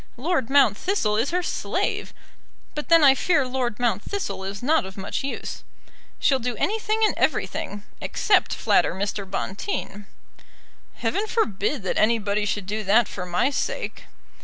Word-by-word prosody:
Lord 270 -2 0
Mount 270 -7 +5
Thistle 295 - 0
is 230 +6 +1
her 360 +1 0
slave, - - -2 0.6
but 300 - -5
then 330 -2 +7
I 275 -2 +8
fear 280 0 +2
Lord 250 -3 -2
Mount 230 -5 +1
Thistle 200 - -4
is 195 +3 -6
not 315 +5 +3
of 190 +1 -9
much 195 +6 -3
use. 275 - -5 0.5
She'll 265 -2 +2
do 245 -1 -2
anything 435 - 0
and - - +2
everything, 205 0 -1 0.2
except - - +2
flatter - - +2
Mr. 200 0 -3
Bonteen." 200 - -4 0.9
"Heaven 420 +2 -1
forbid 225 - 0
that 185 - -1
anybody 210 -2 +2
should 205 -1 -2
do 215 +3 -3
that 210 +3 +4
for 180 -2 -6
my 180 +10 +1
sake." - - -3
235 Hz, 155 wpm, -24 LUFS, 200-295 Hz, 0.9 s, I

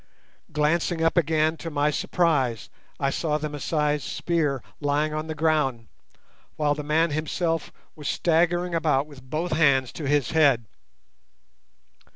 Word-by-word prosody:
Glancing 165 +3 +1
up 165 - +2
again, 160 -1 +2
to 165 - -6
my 150 -1 +1
surprise 140 - 0 0.3
I 140 - +1
saw 150 -1 0
the 150 0 -4
Masai's 150 0 -1
spear 150 -8 -1 0.2
lying 150 +1 0
on 155 +1 -3
the 160 - -4
ground, 145 -8 0 0.7
while 150 -1 +1
the 150 - -5
man 155 +2 +1
himself 165 +1 -1 0.2
was 150 -2 -5
staggering 175 +1 +1
about 150 -4 +2
with 145 -3 -14
both 155 +7 -3
hands 140 -5 +3
to 150 - -5
his 145 -3 +1
head. 140 -8 +4
150 Hz, 140 wpm, -25 LUFS, 145-165 Hz, 0.7 s, head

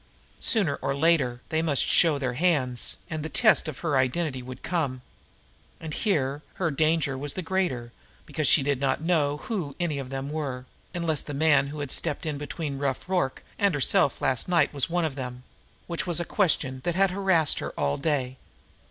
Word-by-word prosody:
Sooner 180 - +2
or 135 - -2
later, 140 -6 +2
they 160 0 +1
must 150 -5 +1
show 160 -4 +4
their 130 -3 -2
hands, 130 -6 +1
and 155 -1 -4
the 160 - -4
test 215 - +4
of 150 -5 -6
her 155 -5 +1
identity 130 +1 0
would 130 +1 -9
come. 140 -8 -1 0.8
And 160 -2 -6
here 145 - 0
her 170 -4 0
danger 155 -1 +1
was 140 +2 -3
the 185 - -3
greater 165 -10 -1 0.3
because 155 -3 -1
she 140 - +5
did 140 -1 0
not 135 +2 0
know 150 -4 +2
who 170 -11 -3
any 160 -5 -1
of 130 -2 -6
them 135 +1 -4
were, 135 -5 -3 0.3
unless 165 -4 0
the 145 - -6
man 145 -2 +4
who 145 +1 -6
had 145 - -3
stepped 160 0 -1
in 150 -3 -2
between 145 -1 -4
Rough 140 +1 -2
Rorke 180 -8 0 0.2
and 200 -6 +3
herself 140 0 +2
last 130 +4 0
night 175 -3 +3
was 140 +1 -1
one 175 0 +1
of 155 - -2
them 125 -2 -6 0.4
which 170 +1 -3
was 175 -1 +1
a 175 - -2
question 140 -10 0
that 175 - -1
had 195 0 +3
harassed 185 -6 +2
her - - -3
all 70 0 +1
day. 140 -4 -1
145 Hz, 195 wpm, -27 LUFS, 135-170 Hz, 0.8 s, she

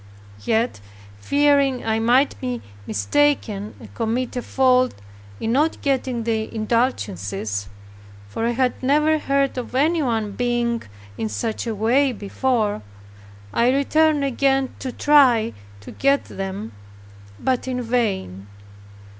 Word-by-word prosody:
Yet, 225 - 0 0.4
fearing 280 - +2
I 220 0 +1
might 245 +5 +3
be 250 -2 -3 0.2
mistaken, 210 - 0
and 110 -4 -13
commit 235 - -2
a 245 - -1
fault 255 0 +2 0.4
in 225 - -1
not 300 +6 +1
getting 260 -4 0
the 220 -1 -1
indulgences, 105 - -2 0.6
for 225 - -2
I - - +1
had 250 +1 0
never 300 +4 +3
heard 275 -2 0
of 250 - -7
anyone 260 -8 +1
being 240 +1 -1 0.4
in 110 - -1
such 215 - -3
a 225 - -2
way 250 +6 +2
before, 215 - -1 0.7
I 235 +1 +3
returned 295 +2 +2
again 270 0 +1
to 260 - -4
try 255 - +4 0.3
to - - -10
get 275 +1 +1
them, 195 - -6 0.7
but 260 -1 -1
in 250 -1 -2
vain. 195 - -2
245 Hz, 120 wpm, -22 LUFS, 215-270 Hz, 0.7 s, try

